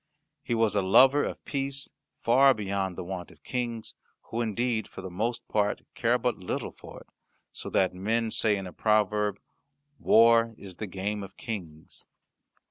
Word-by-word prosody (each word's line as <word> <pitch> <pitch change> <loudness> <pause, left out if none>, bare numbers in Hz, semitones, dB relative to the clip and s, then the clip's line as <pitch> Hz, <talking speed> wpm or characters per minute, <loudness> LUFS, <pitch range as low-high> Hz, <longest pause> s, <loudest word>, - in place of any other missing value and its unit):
He 120 - -2
was 115 -2 +2
a 100 - +2
lover 130 +9 +6
of - - -5
peace 140 0 -2 0.3
far 135 +3 +5
beyond 100 -3 -2
the - - -5
wont 90 -1 -6
of 80 -5 -20
Kings, 120 -3 -3 0.4
who 115 - -1
indeed, 115 0 -1
for - - -10
the 95 - -7
most 115 +6 -2
part, 105 -1 0
care 120 +1 +2
but 125 -2 -1
little 90 - -3
for - - -12
it, - - -18 0.5
so - - -6
that 95 -1 +2
men 110 +5 -1
say 105 -2 +2
in 95 - -5
a 90 - -8
proverb, 105 -1 +1 0.6
"War 115 0 +5
is 95 -4 -11
the 110 - -4
game 100 +3 -3
of 95 0 -10
Kings." 90 - -7
110 Hz, 170 wpm, -28 LUFS, 95-115 Hz, 0.6 s, lover